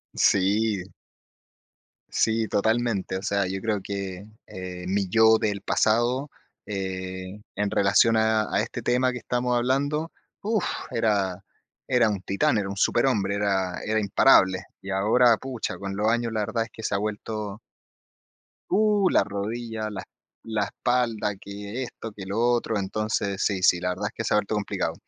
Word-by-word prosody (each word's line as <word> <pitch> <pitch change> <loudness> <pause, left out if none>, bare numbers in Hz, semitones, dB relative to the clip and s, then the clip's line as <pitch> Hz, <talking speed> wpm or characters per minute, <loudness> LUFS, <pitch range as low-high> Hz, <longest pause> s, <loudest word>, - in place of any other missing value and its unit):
Sí. 100 +1 +2 1.3
Sí, 110 0 +1
totalmente. 110 -3 0
O - - -6
sea, 100 -1 0
yo 95 +1 -3
creo 105 -2 -1
que, 95 -1 -5 0.2
eh, 90 -1 -7
mi 100 +1 0
yo 110 +2 +6
del 100 -2 -1
pasado, 120 +8 +1 0.4
eh, 95 0 -5
en 105 0 -1
relación 100 +3 +4
a 110 -1 +2
a - - +3
este - - -5
tema 125 +1 +2
que 125 - -5
estamos 125 +1 -1
hablando, 145 +6 0 0.3
uf, 215 -1 0 0.3
era 100 -4 0 0.4
era 125 -3 +3
un 100 -3 -2
titán, 100 +3 +1
era 100 -2 -1
un 100 - -5
superhombre, 105 -3 +2
era 95 -3 0
era 110 0 +1
imparable. 100 -3 +4 0.2
Y, 95 - -9
ahora, 110 +5 +4
pucha, 125 -8 -4
con 95 +1 -5
los 105 +2 0
años 115 0 0
la 110 - -1
verdad 115 +2 -1
es - - -15
que 110 - -11
se - - -1
ha - - +2
vuelto 105 0 -4 1.1
Uh, 210 -2 +3
la - - +4
rodilla, 110 +2 -4
la 100 -3 -5
es - - -14 0.4
la 110 -2 0
espalda, 115 -2 0
que 100 +5 -6
esto, 115 -2 -8
que 100 -2 -9
lo 100 +3 -4
otro. 120 -2 +1
Entonces 100 0 -2
sí, 95 -3 0
sí, 90 - +5
la 90 +1 -1
verdad 95 +4 -2
es - - -8
que 115 - -4
se - - +1
ha - - +5
vuelto 105 +1 -1
complicado. 105 -1 -2
105 Hz, 165 wpm, -25 LUFS, 100-115 Hz, 1.3 s, yo